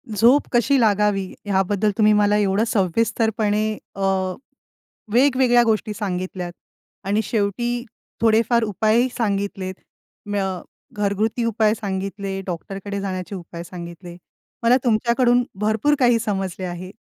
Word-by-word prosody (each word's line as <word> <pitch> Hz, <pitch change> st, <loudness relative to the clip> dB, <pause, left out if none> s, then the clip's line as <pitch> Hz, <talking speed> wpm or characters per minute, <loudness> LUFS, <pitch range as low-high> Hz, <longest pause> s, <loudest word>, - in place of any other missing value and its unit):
झोप 240 Hz, +7 st, +4 dB
कशी 260 Hz, +3 st, +3 dB
लागावी 210 Hz, -3 st, +2 dB, 0.2 s
ह्याबद्दल 200 Hz, +1 st, +1 dB
तुम्ही 215 Hz, -1 st, +5 dB
मला 210 Hz, 0 st, +3 dB
एवढं 200 Hz, +1 st, +2 dB
सविस्तरपणे 215 Hz, +1 st, 0 dB, 0.2 s
अ, 195 Hz, -, -6 dB, 1.1 s
वेगवेगळ्या 255 Hz, -1 st, +4 dB
गोष्टी 220 Hz, -2 st, 0 dB
सांगितल्यात 185 Hz, -3 st, -4 dB, 0.5 s
आणि 205 Hz, +2 st, +2 dB
शेवटी 240 Hz, +3 st, -1 dB, 0.4 s
थोडेफार 230 Hz, +1 st, +3 dB
उपायही 220 Hz, +3 st, +2 dB
सांगितलेत 200 Hz, -3 st, -2 dB, 0.5 s
म्य 205 Hz, -1 st, -1 dB, 0.5 s
घरगुती 210 Hz, +3 st, 0 dB
उपाय 220 Hz, -1 st, +2 dB
सांगितले. 195 Hz, -1 st, -4 dB
डॉक्टरकडे 195 Hz, +3 st, -5 dB
जाण्याचे 190 Hz, 0 st, -4 dB
उपाय 170 Hz, -1 st, -8 dB
सांगितले. 175 Hz, 0 st, -9 dB, 0.5 s
मला 240 Hz, +2 st, +5 dB
तुमच्याकडून 240 Hz, +1 st, +3 dB, 0.2 s
भरपूर 220 Hz, +7 st, +2 dB
काही 240 Hz, -2 st, +4 dB
समजले 195 Hz, -4 st, -3 dB
आहे. 180 Hz, +1 st, -6 dB
210 Hz, 110 wpm, -22 LUFS, 195-230 Hz, 1.1 s, तुम्ही